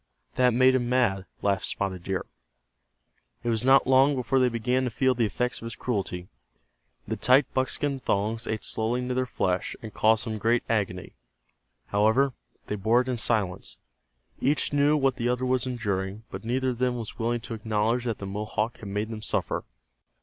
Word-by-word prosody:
"That 125 -2 +3
made 130 +1 +5
him 120 -2 0
mad," 105 -7 +1 0.2
laughed 100 -1 +1
Spotted 95 -3 -2
Deer. 95 -1 -2 1.2
It 120 - -1
was 115 -1 0
not 135 +1 +6
long 135 +2 +5
before 130 +1 +1
they 125 -1 +4
began 125 +2 0
to - - 0
feel 130 +3 +2
the 120 -3 +1
effects 125 +4 -2
of 115 - -5
his 115 - -6
cruelty. 95 -6 -3 0.8
The - - -1
tight 130 +2 +3
buckskin 135 +1 0
thongs 110 0 -1
ate 110 -1 -2
slowly 115 +3 0
into 125 0 -2
their 130 0 0
flesh, 90 -6 -1
and 110 -3 -9
caused 110 +2 +3
them 110 -2 -3
great 115 +3 +2
agony. 95 -5 -1 0.8
However, 110 +7 +3 0.3
they 105 - -3
bore 110 +5 +3
it 130 - -5
in 125 - -1
silence. 100 -5 -1 0.6
Each 145 +2 +1
knew 145 +1 +4
what 135 -3 +1
the 120 +1 0
other 125 +1 0
was 130 0 +1
enduring, 100 -4 -3
but - - -7
neither 130 +3 0
of 120 -2 -4
them 125 -1 +1
was 115 +1 -7
willing 120 +1 0
to 115 - -7
acknowledge 110 +2 0
that 115 -3 -1
the 100 - -7
Mohawk 105 +3 -2
had 105 - -7
made 105 +2 -2
him 110 -1 -6
suffer. - - -2
115 Hz, 185 wpm, -27 LUFS, 105-130 Hz, 1.2 s, not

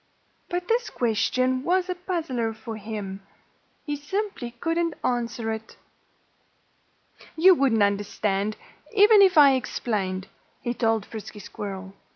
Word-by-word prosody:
But 355 0 -3
this 465 0 +1
question 255 +3 0
was 365 +2 +1
a 365 - -1
puzzler 320 - -3
for 220 0 -7
him. 205 -2 -6 0.6
He 295 -2 -2
simply 300 - -3
couldn't 330 +1 0
answer 235 -2 -1
it. 220 0 -7 1.6
"You 370 +4 +7
wouldn't 260 - +3
understand, 200 0 0 0.4
even 415 0 +7
if 380 -3 +5
I 285 -2 +8
explained," 195 -7 -2 0.4
he 240 - -1
told 225 -3 +1
Frisky 215 -1 -9
Squirrel. 195 -1 -7
240 Hz, 120 wpm, -25 LUFS, 215-335 Hz, 1.6 s, I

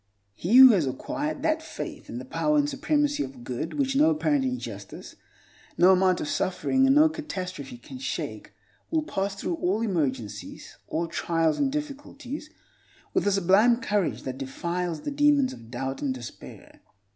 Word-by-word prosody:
He 180 - 0
who 260 -1 +11
has 175 -10 +2
acquired 295 - -3
that 320 0 +1
faith - - -8
in - - -5
the - - -6
power 300 0 +1
and 290 0 +3
supremacy 290 +1 0
of 130 -2 -9
good, 125 +6 -4
which 270 -2 0
no 300 +3 +5
apparent 300 -3 +1
injustice, 255 -1 -6 0.6
no 180 +2 +7
amount 185 -1 +3
of - - -3
suffering, 265 - +1
and 270 - +5
no 305 +2 +7
catastrophe 185 - -6
can 255 - -11
shake, 265 - -5 0.4
will 320 -2 +1
pass 195 -9 -2
through 180 -3 -3
all 190 +6 0
emergencies, 135 - -3
all 170 - -1
trials 165 -1 0
and 275 -2 +1
difficulties, 290 0 -6 0.6
with - - +1
a - - +4
sublime 200 +5 +4
courage 205 -6 -1
that 130 0 -5
defies 170 +4 -3
the - - -4
demons 285 -2 +3
of 115 -1 -13
doubt 135 +2 -4
and 135 -3 -1
despair. 120 -2 -11
205 Hz, 165 wpm, -26 LUFS, -, 0.6 s, who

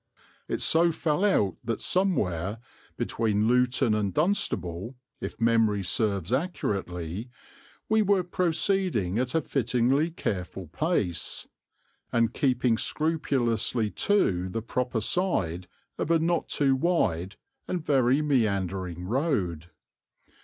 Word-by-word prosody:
It - - -2
so 170 +1 +4
fell 160 +2 0
out 105 - +2
that 115 -1 -2
somewhere, 105 - 0 0.4
between 110 -2 0
Luton 125 -2 +3
and 105 -2 0
Dunstable, 120 - -1 0.2
if - - -6
memory 115 -3 +2
serves 100 0 +1
accurately, 100 - -2 0.6
we 220 0 +3
were 200 -2 +3
proceeding 175 - 0
at 125 +2 -1
a 160 - +3
fittingly 130 +4 +1
careful 95 - -4
pace, 95 - -2 0.6
and 115 -1 +2
keeping 125 -4 +1
scrupulously 125 -8 0
to 95 - +1
the 110 +4 -4
proper 125 -1 -2
side 95 - -1 0.3
of - - -2
a 165 - +5
not 165 +1 0
too 135 -2 +2
wide 105 - 0 0.3
and 175 -3 -3
very 135 +1 +3
meandering 95 - 0
road. 95 - -1
120 Hz, 110 wpm, -27 LUFS, 95-160 Hz, 0.6 s, a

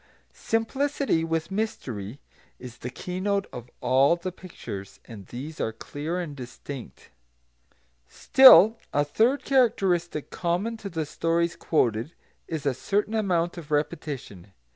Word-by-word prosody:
Simplicity, 265 - 0
with 165 +2 -2
mystery, 130 - -4 0.4
is 125 -1 -11
the 125 - -5
keynote 195 +7 -2
of 125 0 -8
all 130 +5 +4
the 175 +2 -5
pictures, 105 - -9
and 105 -5 -11
these 145 +6 -7
are 110 - -1
clear 150 +9 -5
and 160 -5 -5
distinct. 125 - -9 1.0
Still 225 - +7
a 145 0 +2
third 245 - +2
characteristic 185 - +1
common 180 +7 -1
to 205 -2 -7
the 160 -3 -3
stories 170 +3 0
quoted 120 -3 0 0.3
is 160 -3 -4
a 140 - +2
certain 205 - -1
amount 175 -6 0
of 160 -2 -12
repetition. 140 - -3
165 Hz, 125 wpm, -26 LUFS, 130-195 Hz, 1.0 s, Still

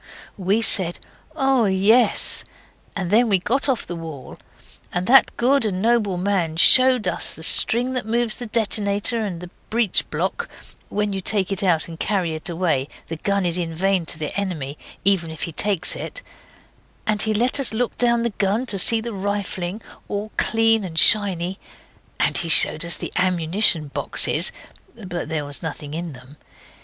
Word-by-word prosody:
We 200 +4 -1
said, 180 -6 +3 0.4
'Oh, 270 -5 +1
yes', 205 +5 +2 0.5
and 190 -3 -4
then 230 +2 +3
we 195 - +4
got 240 +10 -1
off 255 -5 -1
the 175 - -7
wall, 160 -5 -10 0.5
and 180 0 -3
that 265 +6 +4
good 270 +3 +1
and 195 -4 -2
noble 215 -3 0
man 180 -4 -2
showed 255 +5 +5
us - - 0
the - - -7
string 245 +3 +7
that 255 -4 -4
moves 235 0 0
the 245 - -7
detonator 215 0 +1
and 180 -5 -6
the 180 -1 -11 0.2
breech 225 -4 0
block 470 - -4 0.4
(when 210 -1 -3
you 195 - -4
take 200 0 +1
it 195 - -1
out 175 -5 0
and 165 -1 -11
carry 185 -5 -2
it 155 +3 -6
away 165 -6 -2 0.2
the 165 - -5
gun 200 +3 -2
is 175 0 -1
in 165 -2 -5
vain 190 -1 -1
to - - -3
the 155 -1 -6
enemy, 165 -9 -5 0.3
even 190 -4 +2
if 160 -1 -8
he 170 - -4
takes 190 +1 +1
it); - - -7 0.8
and 210 -1 0
he 220 - 0
let 245 +6 +1
us 275 - +3
look 235 +2 -3
down 235 -1 +1
the 235 - -2
gun 205 +5 -2
to 205 -6 -3
see 225 +4 +3
the 235 0 -7
rifling, 200 0 -5 0.2
all 205 +1 -5
clean 225 -1 +1
and 165 -4 -8
shiny 190 -2 +3 0.6
and - - +1
he 170 - -3
showed 155 0 +3
us 170 0 +2
the - - -8
ammunition 175 -2 0
boxes, - - +4 0.4
but 185 -6 -7
there 155 -2 -3
was 145 -2 -3
nothing 150 -2 -7
in 165 -1 -6
them. 130 +3 -16
195 Hz, 180 wpm, -20 LUFS, 170-225 Hz, 0.8 s, string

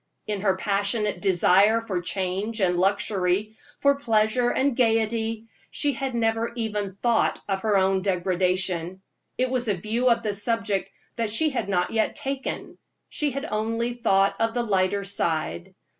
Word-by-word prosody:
In 205 -2 -3
her 190 -2 +2
passionate 205 +2 0
desire 195 +3 +4
for 200 -6 -3
change 190 +5 -2
and 180 -3 +1
luxury, 195 +1 0 0.2
for 280 0 +4
pleasure 225 0 +2
and 270 0 +1
gayety, 225 -1 0 0.2
she 290 -1 0
had 270 -3 -3
never 225 0 0
even 210 -4 -3
thought 235 +2 +1
of 195 -1 -1
her 210 -1 +2
own 190 0 +2
degradation; 185 -1 -1 0.3
it 255 0 0
was 250 -2 -1
a 205 - +1
view 225 +7 0
of 235 - +2
the 210 -2 -1
subject 210 -1 0 0.3
that 230 -2 -1
she 300 +9 +2
had 250 -6 -3
not 180 -2 0
yet 220 -1 0
taken; 275 -2 -5 0.3
she 300 - -1
had 275 +2 -4
only 230 +1 -2
thought 195 -5 +2
of 225 +1 0
the 240 - +1
lighter 200 -2 +1
side. 160 - -2
215 Hz, 160 wpm, -25 LUFS, 190-230 Hz, 0.3 s, desire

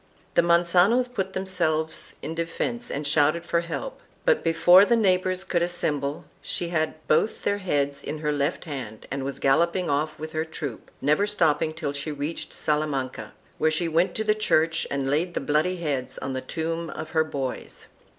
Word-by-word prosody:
The - - +5
Mancanos 175 +8 +4
put 195 -6 -3
themselves 170 -5 0
in 160 - -3
defence 170 +9 -3
and 145 +1 -3
shouted 155 +3 +2
for 170 - +1
help, 170 - -5 0.2
but - - +3
before 175 +3 +7
the 235 +3 +3
neighbors 185 -3 +2
could 175 - 0
assemble 150 -5 -1 0.2
she 170 - -2
had 160 -2 0
both 185 +8 +2
their 205 0 0
heads 145 -7 -1
in 155 - -4
her 150 -1 -1
left 145 +4 -1
hand 130 -8 -7
and 135 -1 -2
was 135 0 -4
galloping 170 +5 +2
off 150 +2 0
with 155 +1 -6
her 155 0 -1
troop, 150 -6 -7
never 150 +9 +2
stopping 160 -7 +2
till 155 -3 -4
she 145 +2 -3
reached 145 +3 -4
Salamanca, 150 -4 -2 0.3
where 155 - +4
she 155 +2 0
went 165 +3 +1
to 220 - -1
the 215 0 +3
church 165 -6 +1
and 140 -1 -1
laid 160 +6 0
the - - +1
bloody 155 +6 +1
heads 145 -6 -3
on 135 - -4
the 130 - -3
tomb 165 +4 -3
of 155 0 -7
her 160 -1 +3
boys. 135 -5 -5
160 Hz, 180 wpm, -25 LUFS, 145-175 Hz, 0.3 s, before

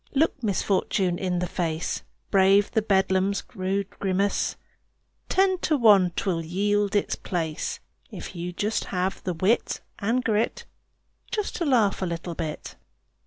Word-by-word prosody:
Look 290 -1 +2
misfortune 190 -3 0
in 180 -2 -1
the 180 - 0
face. 165 -2 -2 0.3
Brave 195 +1 +5
the 220 - +2
beldam's 195 -1 +2
rude 195 -1 -2
grimace; 195 +1 0 0.7
Ten 375 -1 +3
to 310 -4 +1
one 205 -7 +6
'twill 170 -4 -1
yield 205 +4 0
its 205 - +1
place, 165 -4 -3 0.3
If - - -8
you 175 +1 -4 0.4
have 185 +1 -2
the 180 -2 -2
wit 190 +8 +1 0.2
and 230 +5 +1
grit 220 -1 0 0.6
Just 420 -3 -2
to 340 - -1
laugh 225 -9 +3
a 185 - 0
little 170 0 -4
bit. 160 -2 -5
195 Hz, 135 wpm, -26 LUFS, 180-210 Hz, 0.7 s, one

